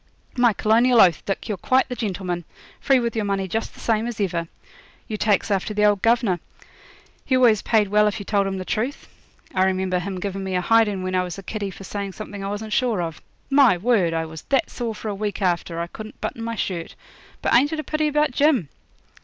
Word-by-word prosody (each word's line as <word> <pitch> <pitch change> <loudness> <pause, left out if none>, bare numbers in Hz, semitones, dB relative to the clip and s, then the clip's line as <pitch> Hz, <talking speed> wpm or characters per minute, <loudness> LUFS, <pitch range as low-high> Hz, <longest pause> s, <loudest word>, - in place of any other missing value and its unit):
'My 245 -2 +4
colonial 230 +4 +3
oath, 175 -6 +5
Dick, 195 - -2
you're 205 -4 -3
quite 260 +7 +2
the 250 - -5
gentleman 185 -6 -3 0.4
free 270 -2 +3
with 235 -1 -2
your 220 - 0
money 195 -1 -1
just 225 +5 -3
the - - -15
same 225 0 0
as 240 -2 -6
ever. 175 -4 -1 0.6
You 215 - -3
takes 210 0 +1
after 200 +2 -1
the 210 0 +3
old 205 -2 +3
governor; 230 -6 +2 0.8
he 260 - +1
always 235 -5 +5
paid 220 -3 +2
well 210 +1 +4
if 210 - -1
you 200 - -7
told 200 -1 +1
him 195 0 -3
the 185 - -5
truth. 245 - -3 0.5
I 185 - +2
remember 185 -1 0
him 190 +1 -4
giving 195 0 -4
me 190 -1 -3
a 180 - +1
hidin' 210 -2 +3
when 185 0 -3
I 185 - +2
was 180 0 -5
a 195 - -8
kiddy 205 0 -4
for 195 - -10
saying 200 0 -5
something 205 -1 -7
I 195 - -3
wasn't 210 +1 -4
sure 240 -6 +1
of. 165 -2 -4 0.3
My 275 -9 +6
word! 195 -4 +2
I 165 0 -1
was 160 -1 -9
that 270 -2 +1
sore 235 -3 -4
for 220 - -7
a 210 - -1
week 205 +1 -3
after 175 -3 -1
I 170 - -1
couldn't 215 +5 -10
button 230 - -4
my 230 0 -3
shirt. 175 -5 -4 0.5
But - - +1
ain't 280 +5 +5
it 315 - -2
a - - -3
pity 305 0 0
about 300 -1 +2
Jim?' 270 - +2
205 Hz, 230 wpm, -23 LUFS, 185-230 Hz, 0.8 s, My